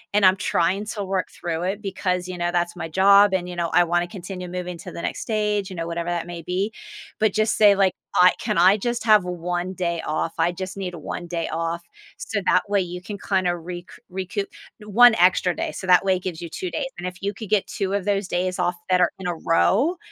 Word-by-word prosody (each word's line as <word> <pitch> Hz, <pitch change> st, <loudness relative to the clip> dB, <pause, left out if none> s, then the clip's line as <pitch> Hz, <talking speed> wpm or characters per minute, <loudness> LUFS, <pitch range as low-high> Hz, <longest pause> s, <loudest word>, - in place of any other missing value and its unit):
and 205 Hz, -1 st, +5 dB
I'm 185 Hz, 0 st, +6 dB
trying 190 Hz, +2 st, 0 dB
to 210 Hz, -2 st, -4 dB
work 190 Hz, -1 st, -2 dB
through 170 Hz, -1 st, -4 dB
it 195 Hz, +3 st, -2 dB
because, 185 Hz, -2 st, -2 dB
you 185 Hz, -1 st, -6 dB
know, 175 Hz, 0 st, 0 dB
that's 175 Hz, 0 st, -1 dB
my 165 Hz, -2 st, -5 dB
job, 200 Hz, +3 st, +6 dB
and, 180 Hz, -2 st, 0 dB
you 180 Hz, -, -6 dB
know, 170 Hz, -1 st, -1 dB
I 175 Hz, -, +5 dB
wanna 175 Hz, +1 st, 0 dB
continue 180 Hz, 0 st, -7 dB
moving 180 Hz, 0 st, -5 dB
to -, -, -9 dB
the -, -, -7 dB
next -, -, -3 dB
stage, 210 Hz, -2 st, -1 dB
you 185 Hz, -, -8 dB
know, 165 Hz, -1 st, -3 dB
whatever 170 Hz, 0 st, -3 dB
that 175 Hz, -1 st, -2 dB
may 175 Hz, -1 st, -6 dB
be." 185 Hz, +6 st, -2 dB, 0.5 s
But, 215 Hz, -2 st, +2 dB
just 215 Hz, +1 st, +1 dB
say, 205 Hz, -2 st, +6 dB
like, 195 Hz, -2 st, +3 dB, 0.2 s
"I 180 Hz, 0 st, +7 dB
Can -, -, -2 dB
I 185 Hz, +4 st, +6 dB
just 240 Hz, +2 st, -2 dB
have 215 Hz, -3 st, +5 dB
1 180 Hz, +1 st, -3 dB
day 170 Hz, -2 st, -2 dB
off? 155 Hz, +1 st, -2 dB
I 165 Hz, +2 st, +3 dB
just 185 Hz, +1 st, -6 dB
need 180 Hz, -3 st, -4 dB
1 170 Hz, +2 st, -6 dB
day 170 Hz, -1 st, -3 dB
off." 165 Hz, +1 st, -3 dB, 0.3 s
So, 205 Hz, -, -3 dB
that -, -, +4 dB
way 200 Hz, -1 st, +2 dB
you 180 Hz, 0 st, -5 dB
can 200 Hz, +2 st, -7 dB
kinda 185 Hz, -3 st, 0 dB
rec 175 Hz, +1 st, -7 dB, 0.2 s
recoup 190 Hz, +2 st, -3 dB, 0.4 s
1 235 Hz, +3 st, +7 dB
extra 180 Hz, 0 st, +3 dB
day, -, -, -3 dB
so 185 Hz, -, -7 dB
that 180 Hz, 0 st, +6 dB
way 190 Hz, -1 st, +3 dB
it 185 Hz, -, -6 dB
gives 175 Hz, -4 st, -5 dB
you 170 Hz, -, -6 dB
2 365 Hz, -, -5 dB
days, 290 Hz, -, -2 dB
and 175 Hz, +1 st, -4 dB
if 180 Hz, 0 st, -8 dB
you 200 Hz, +1 st, -2 dB
could 215 Hz, 0 st, -9 dB
get 210 Hz, -3 st, +2 dB
2 195 Hz, -3 st, -3 dB
of 200 Hz, -2 st, -1 dB
those 200 Hz, -1 st, 0 dB
days 180 Hz, 0 st, -1 dB
off 175 Hz, 0 st, +1 dB
that 180 Hz, -1 st, +4 dB
are 175 Hz, -, +3 dB
in 185 Hz, -, -4 dB
a 175 Hz, -, -1 dB
row, 215 Hz, -, +2 dB
185 Hz, 245 wpm, -23 LUFS, 175-200 Hz, 0.5 s, I